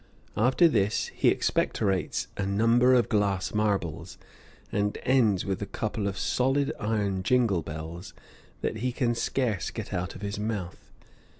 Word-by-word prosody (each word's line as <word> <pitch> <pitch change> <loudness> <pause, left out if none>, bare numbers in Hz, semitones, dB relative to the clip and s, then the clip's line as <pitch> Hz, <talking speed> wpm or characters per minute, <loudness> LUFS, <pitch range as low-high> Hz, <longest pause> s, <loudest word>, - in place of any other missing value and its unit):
After 130 +10 +4
this 105 -7 +1
he - - +1
expectorates 95 -4 0
a - - -2
number 115 +6 +4
of 120 - +3
glass 100 -3 0
marbles, 100 -7 -1 0.5
and 105 0 0
ends 120 -7 +3
with 95 -1 -2
a 100 - -3
couple 105 -1 -3
of 95 -1 -3
solid 135 +2 +1
iron 105 -4 -1
jingal 110 -4 +2
balls 80 +4 -7 0.5
that - - -2
he 125 +3 -1
can 120 -1 0
scarce 115 - -1
get - - -7
out 90 -1 -3
of 100 - -9
his 100 0 -3
mouth. 105 -5 -4
105 Hz, 145 wpm, -27 LUFS, 95-120 Hz, 0.5 s, After